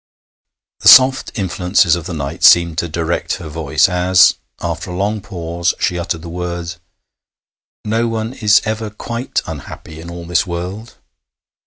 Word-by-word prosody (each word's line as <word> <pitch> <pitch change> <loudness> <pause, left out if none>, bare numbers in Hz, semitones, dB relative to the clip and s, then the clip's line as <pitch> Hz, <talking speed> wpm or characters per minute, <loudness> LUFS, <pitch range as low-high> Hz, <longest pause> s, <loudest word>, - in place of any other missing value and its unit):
The - - -1
soft 130 0 +6
influences 90 -3 +1
of 85 -2 -6
the 90 - -5
night 70 -2 -5
seemed 85 -2 +5
to 85 - -2
direct 85 +1 -2
her 85 -5 -9
voice 75 +1 +1
as, 90 0 +4 0.3
after 85 +1 -4
a 90 - -5
long 105 +2 -1
pause, 85 -3 -3
she 90 -2 -1
uttered 85 -2 -4
the - - -8
words: 85 0 -5 1.1
'No 115 +2 0
one 115 +1 -3
is 110 -4 +3
ever 110 0 -3
quite 115 +4 -4
unhappy 80 0 -9
in 85 - -9
all 85 0 -8
this 85 +3 0
world.' 90 +6 -6
90 Hz, 155 wpm, -17 LUFS, 85-105 Hz, 1.1 s, soft